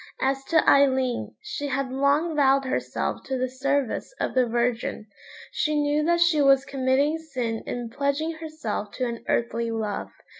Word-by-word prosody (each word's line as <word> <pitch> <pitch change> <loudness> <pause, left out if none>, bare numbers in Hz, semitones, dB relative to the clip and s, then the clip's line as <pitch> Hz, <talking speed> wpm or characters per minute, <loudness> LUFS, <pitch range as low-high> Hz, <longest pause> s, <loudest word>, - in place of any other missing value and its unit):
As 270 0 0
to 320 -2 +2
Aileen, 265 -3 +3
she 425 -9 -4
had 270 -1 -2
long 285 +5 +1
vowed 275 -1 +4
herself 260 - -2
to 265 - -2
the 255 0 0
service 275 - -1
of - - -1
the 255 -2 +3
Virgin. 235 -2 -1 0.5
She 305 -1 0
knew 295 +1 +1
that 340 +1 +2
she 345 -3 +4
was 275 -1 +5
committing 275 +3 +1
sin 250 -8 -3
in 240 -2 -4
pledging 280 +4 -1
herself 310 -10 -5
to 255 - -2
an 235 -1 -5
earthly 230 0 0
love. 220 -2 -3
270 Hz, 160 wpm, -25 LUFS, 245-295 Hz, 0.5 s, was